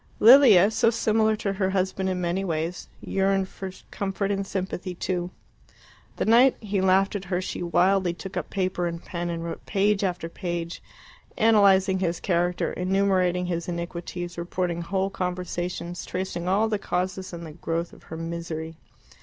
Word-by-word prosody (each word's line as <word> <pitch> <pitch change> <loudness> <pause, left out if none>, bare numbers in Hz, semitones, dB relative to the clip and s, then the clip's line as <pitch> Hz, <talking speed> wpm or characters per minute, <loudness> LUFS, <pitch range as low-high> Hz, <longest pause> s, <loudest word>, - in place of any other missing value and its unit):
Lilia, 220 -5 +8
so 225 +1 +3
similar 220 -1 +2
to 200 -2 -2
her 190 -1 0
husband 190 0 0
in 185 -1 -1
many 180 +2 -1
ways, 165 -1 -3
yearned 195 0 +1
for 190 0 -7 0.2
comfort 200 0 -2
and 195 -1 -2
sympathy 185 -1 -4
too. 175 0 -2 0.9
The - - -1
night 245 +4 +5
he 205 -3 -1
laughed 190 +2 +3
at 195 -1 -4
her 180 -1 -1
she 185 - -4
wildly 175 +2 +2
took 190 +2 -8
up - - -3
paper 185 -2 -1
and 170 0 -6
pen 175 -1 -4
and 165 -1 -3
wrote 170 - -6
page 200 +1 +2
after 175 -3 -1
page, 170 -1 -4 0.6
analysing 195 -4 +4
his 175 -2 -1
character, 175 -1 0
enumerating 185 -1 +1
his 170 -1 -3
iniquities, 175 0 -5
reporting 175 0 -2
whole 190 +3 -1
conversations, 180 -1 -4
tracing 180 -1 -4
all 200 +4 +3
the 215 -2 -1
causes 185 0 -2
and 170 -1 -7
the 160 - -8
growth 165 +1 -3
of - - -15
her 160 - -6
misery. 165 -1 -5
185 Hz, 160 wpm, -25 LUFS, 175-195 Hz, 0.9 s, Lilia